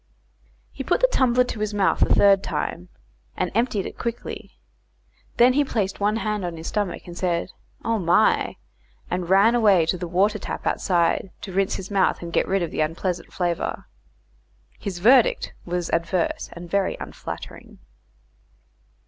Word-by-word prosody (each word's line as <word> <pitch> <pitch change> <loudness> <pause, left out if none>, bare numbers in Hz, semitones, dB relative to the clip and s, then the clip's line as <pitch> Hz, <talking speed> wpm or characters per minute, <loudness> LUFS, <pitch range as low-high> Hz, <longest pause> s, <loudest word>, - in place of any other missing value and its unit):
He - - -6
put 350 - +1
the - - +6
tumbler 250 - +3
to 240 -3 -6
his 215 0 -2
mouth 195 -2 +2
a - - +3
third 200 -1 +5
time, 180 -2 -4 0.5
and 185 - -1
emptied 225 -3 0
it - - -8
quickly. 235 0 -6 0.8
Then 245 +2 +6
he 290 +2 +3
placed 205 -8 -2
one 205 +1 +1
hand 210 -3 -2
on 175 -2 -4
his 160 - -9
stomach, 205 -1 -2
said 175 0 -1 0.3
"Oh, 230 -1 +1
my," 170 -2 +2 0.6
and 180 -1 -2
ran 200 +5 +5
away 205 -8 +4
to 180 +2 -1
the 175 - -4
water 190 +5 +1
tap - - -6
outside 175 0 +1
to 190 - -7
rinse 195 +2 +1
his 190 +1 -7
mouth 195 -3 +1
and 170 -1 -7
get - - +2
rid 195 -1 +1
of 165 - -4
the - - -1
unpleasant 170 +3 -2
flavour. 175 -2 -2 0.9
His 195 -3 -5
verdict 240 +6 +4
was 175 -1 -3
adverse, 170 +1 -1
and 175 0 -9
very 195 +2 0
unflattering. - - -8
195 Hz, 160 wpm, -23 LUFS, 175-215 Hz, 0.9 s, the